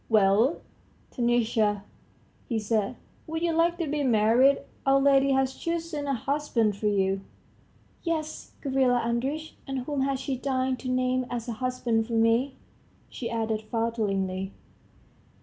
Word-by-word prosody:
"Well, 215 - +4 0.5
Taniusha," 230 -4 +1 0.7
he 230 - 0
said, 215 -1 0 0.3
"would 320 +1 -3
you 340 -1 +2
like 335 +1 +2
to 335 - -1
be 295 +1 -1
married? 245 +3 +4 0.2
Our 270 0 +4
lady 275 0 +4
has 265 0 +2
chosen 330 -2 -3
a 275 - +1
husband 245 -5 0
for 210 +1 -2
you?" 195 -1 +1 0.8
"Yes, 315 -2 -3
Gavrila 260 -3 +2
Andreitch. 265 +7 -2
And 270 -1 -2
whom 280 +2 -2
has 270 -1 0
she 270 -1 -2
deigned 260 -1 0
to 255 - -5
name 255 0 +1
as 240 -1 -4
a 235 - -2
husband 240 -2 -1
for 235 - -5
me?" 230 +4 +2 0.5
she 235 - -5
added 220 -1 -1
falteringly. 200 -4 -2
255 Hz, 140 wpm, -27 LUFS, 225-275 Hz, 0.8 s, Well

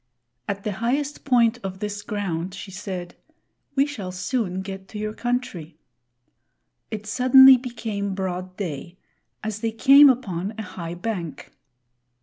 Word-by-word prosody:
At 200 0 -3
the 210 - -1
highest 265 +8 -2
point 245 -3 +3
of 190 -1 -5
this 205 +1 -4
ground, 190 -4 -3
she 195 0 -8
said, 185 -2 -6 0.6
"We 275 0 +4
shall 210 -11 -6
soon 190 0 -2
get 190 0 -7
to 210 - -9
your 215 0 -3
country." 220 -11 -3 1.1
It 215 -1 -5
suddenly 260 +4 +8
became 220 -5 -4
broad 185 -1 -4
day, 175 -1 -5 0.5
as 215 -1 -3
they 225 - -1
came 275 +5 +8
upon 205 -6 -1
a 220 - -4
high 175 -3 -7
bank. 175 -4 -5
205 Hz, 135 wpm, -24 LUFS, 185-240 Hz, 1.1 s, suddenly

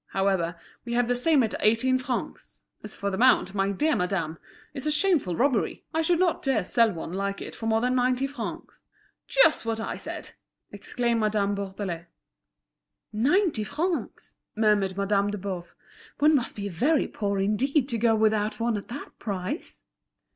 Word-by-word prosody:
However, 190 -3 0 0.2
we 235 - -5
have 240 0 +2
the 245 - +2
same 270 +2 +3
at 220 - -2
eighteen 240 +4 +3
francs; 255 -1 -5 0.2
as 215 - -7
for 200 0 -2
the 190 - -3
mount, 245 -6 +4
my 195 -1 +1
dear 300 +10 +1
madame, 175 -3 -2 0.3
it's 270 +2 -5
a - - +2
shameful 300 - +2
robbery. 255 - 0
I 320 - +1
should 340 +2 +2
not 355 -1 +1
dare 265 -6 +1
to - - -6
sell 230 +4 +3
one 170 -1 -6
like 200 +1 -2
it - - -7
for 225 - -5
more 225 0 +2
than 250 +1 +1
ninety 255 +1 +2
francs." 275 -4 -6 0.5
"Just - - +4
what 225 -1 -2
I 225 - -4
said!" - - -7 0.4
exclaimed 235 -2 -1
Madame 210 -2 +1
Bourdelais. 190 -4 -5 1.1
"Ninety 290 - +2
francs!" 330 - -3 0.2
murmured 210 -3 +2
Madame 200 0 +1
de 210 - -3
Boves; 185 -3 -5 0.5
"one 300 +1 +5
must 250 -4 -1
be 205 -1 -4
very 265 - +1
poor 200 -2 -2
indeed 250 +8 +1
to 230 - -1
go 225 0 +3
without 215 -1 +1
one 230 -1 0
at 200 - -7
that 270 +5 -9
price." 200 - -4
220 Hz, 175 wpm, -26 LUFS, 200-260 Hz, 1.1 s, one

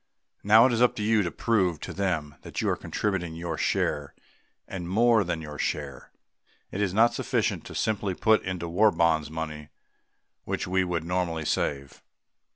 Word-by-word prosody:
Now 110 +3 +7
it 130 - +3
is 115 - 0
up 125 - +4
to 105 - -3
you 110 0 +3
to 90 - -1
prove 95 -7 0
to - - -6
them 85 -7 -2
that - - -7
you - - 0
are - - +1
contributing 90 -6 -3
your 85 -1 -4
share - - -1 0.5
and 90 -2 -6
more 115 +2 +4
than 85 -3 -3
your 75 -1 -8
share. 70 -4 -3 0.6
It 100 - -3
is 100 -3 +1
not 115 +4 +4
sufficient - - -1
to - - -9
simply 100 -3 -1
to - - -24
put 110 -1 +4
into 90 -2 -4
War 100 +6 +4
Bonds 80 -4 +1
money 75 -2 -6 0.7
which - - -3
we 95 +1 +1
would 90 -2 -2
normally 85 -2 -2
save. 70 -2 -2
90 Hz, 180 wpm, -27 LUFS, 80-105 Hz, 0.7 s, Now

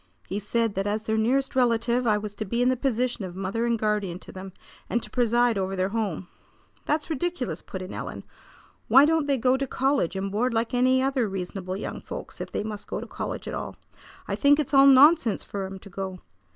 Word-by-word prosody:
He 195 - -2
said 225 +1 0
that 195 +1 -2
as 215 +1 -1
their 220 0 -1
nearest 255 +6 +1
relative 240 0 +2
I 210 -1 +4
was 210 -1 -5
to 215 - -4
be 235 +4 0
in 250 - +4
the 255 - +2
position 250 -3 -1
of 180 -2 -6
mother 195 +5 -2
and 235 -1 +1
guardian 210 -5 -1
to - - -11
them, 190 0 -8 0.4
and 235 - 0
to 210 - -11
preside 240 -2 +2
over 190 0 -2
their 185 0 0
home." 200 -5 -2 0.6
"That's 305 +2 0
ridiculous!" 320 -3 -2
put 190 -1 -7
in 185 - -8
Ellen. - - -6 0.6
"Why 270 +2 +7
don't 315 -1 +2
they 280 -1 +2
go 255 +2 +3
to 275 0 -2
college 265 - 0
and 195 0 -3
board 230 +4 0
like 230 +2 0
any 255 +1 +3
other 265 -5 +1
reasonable 185 0 -4
young - - -5
folks - - -8
if - - -6
they - - -2
must 210 -1 -6
go - - -3
to - - -6
college - - -5
at - - -4
all? - - -5 0.5
I - - -2
think 285 +1 +4
it's 290 -1 -2
all 275 0 +8
nonsense 275 -3 +6
for 195 -1 -4
'em 190 0 -8
to 200 +1 -13
go. 190 0 -5
225 Hz, 225 wpm, -26 LUFS, 195-260 Hz, 0.6 s, all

